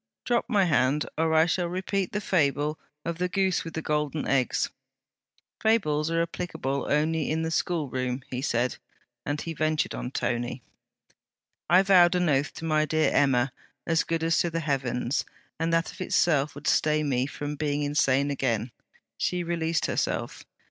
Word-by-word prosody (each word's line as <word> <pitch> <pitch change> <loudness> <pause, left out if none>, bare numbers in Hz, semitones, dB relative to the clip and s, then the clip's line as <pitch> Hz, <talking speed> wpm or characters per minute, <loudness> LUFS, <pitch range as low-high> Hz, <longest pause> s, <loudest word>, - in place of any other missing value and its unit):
Drop 240 -1 +1
my 205 -5 +3
hand, 145 -2 +2
or 160 0 +1
I 160 +1 +6
shall 175 +1 0
repeat 185 +2 -2
the 210 - -1
fable 150 -4 +1 0.3
of 170 0 -3
the 180 0 0
Goose 190 -2 +1
with 165 - -8
the 160 - -3
Golden 150 0 -1
Eggs.' 130 -3 +1 0.9
'Fables 155 -9 +2
are 165 0 +1
applicable 165 -5 -3
only 155 +1 +1
in 160 +1 0
the 160 - -2
school 165 -3 0
room,' 130 0 -3 0.2
said 125 -2 +1
he; - - -9 0.5
and 145 0 -1
he 165 - -4
ventured 155 0 0
on 125 - -4
'Tony!' 120 -1 -2 1.1
'I 185 +2 +6
vowed 180 -2 +6
an 180 -2 +2
oath 140 0 +1
to 165 - -6
my 155 -1 +2
dear 155 +1 +1
Emma 130 -2 +2 0.3
as 165 -1 +2
good 165 -1 -2
as 165 0 +2
to 175 - +1
the 165 0 -2
heavens! 130 -3 -1 0.4
and 165 +1 0
that 165 0 +1
of - - -11
itself 150 -4 +2
would 145 +1 -10
stay 155 0 +2
me 130 -3 0
from 145 +1 -5
being 145 0 -1
insane 145 -1 +2
again.' 120 -4 -1 0.5
She 180 -1 0
released 165 -1 -1
herself. - - -2
155 Hz, 170 wpm, -27 LUFS, 140-170 Hz, 1.1 s, I